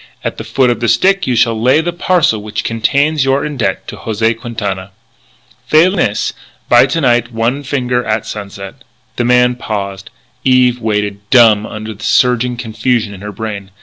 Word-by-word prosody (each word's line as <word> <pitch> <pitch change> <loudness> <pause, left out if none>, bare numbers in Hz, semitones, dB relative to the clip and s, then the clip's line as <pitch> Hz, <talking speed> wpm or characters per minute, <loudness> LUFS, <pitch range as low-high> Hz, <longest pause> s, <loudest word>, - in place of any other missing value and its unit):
At - - -3
the - - -5
foot 125 +3 +1
of 120 - -2
the 120 - -1
stick 190 - +2
you 125 - +1
shall 115 -1 +2
lay 130 +6 +4
the 170 +2 -2
parcel 175 - +1
which 105 0 -4
contains 140 +6 +1
your 135 +1 +1
indebt 145 -6 -2
to - - -8
José 110 +1 -1
Quintana. 105 -5 -5 0.8
"Failing 175 +5 +4
this, 105 -11 0 0.3
by 120 +2 +5
to 165 +5 -1
night 120 -3 +2
one 115 +5 -1
finger 125 -3 -1
at 110 -1 -2
sunset." 100 -2 -8 0.3
The 120 - 0
man 125 0 +4
paused: 100 -5 -5 0.3
Eve 125 -2 +3
waited, 105 -2 -1
dumb 110 -4 +5
under 110 0 -7
the 105 +1 -13
surging 125 -1 +2
confusion 115 -1 -1
in 95 - -11
her 105 0 -6
brain. 100 -2 -6
115 Hz, 175 wpm, -14 LUFS, 110-130 Hz, 0.8 s, by